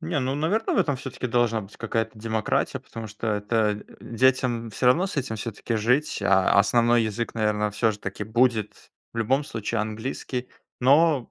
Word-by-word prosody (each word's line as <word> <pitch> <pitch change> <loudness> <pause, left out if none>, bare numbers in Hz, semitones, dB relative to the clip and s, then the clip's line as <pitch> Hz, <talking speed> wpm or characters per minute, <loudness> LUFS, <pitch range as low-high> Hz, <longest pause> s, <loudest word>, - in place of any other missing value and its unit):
Не 165 -2 -2
ну, 130 +1 -1
наверное, 180 +10 0
в - - +1
этом 145 -8 +2
всё-таки 130 0 -5
должна 120 -2 +1
быть 95 - -14
какая-то 115 -1 -2
демократия, 110 -1 -1
потому 115 -1 -9
что, 105 +2 -7
э, 105 -1 +1
это, 105 0 0
э, - - -16
детям 120 -1 +1
всё 125 - -1
равно 170 +10 +4
с 190 - -7
этим 125 -5 -2
всё-таки 115 +1 -4
жить. 125 +5 +1
А 100 0 +4
основной 120 +3 +4
язык 115 +2 -3
наверно 105 -1 0
всё 110 +2 +1
же 105 - -6
таки 100 +2 -5
будет 110 -1 0 0.2
в 115 - -6
любом 130 +6 +1
случае 115 -2 -3
английский, 125 +3 -4 0.3
но 140 0 +4
115 Hz, 185 wpm, -25 LUFS, 110-130 Hz, 0.3 s, равно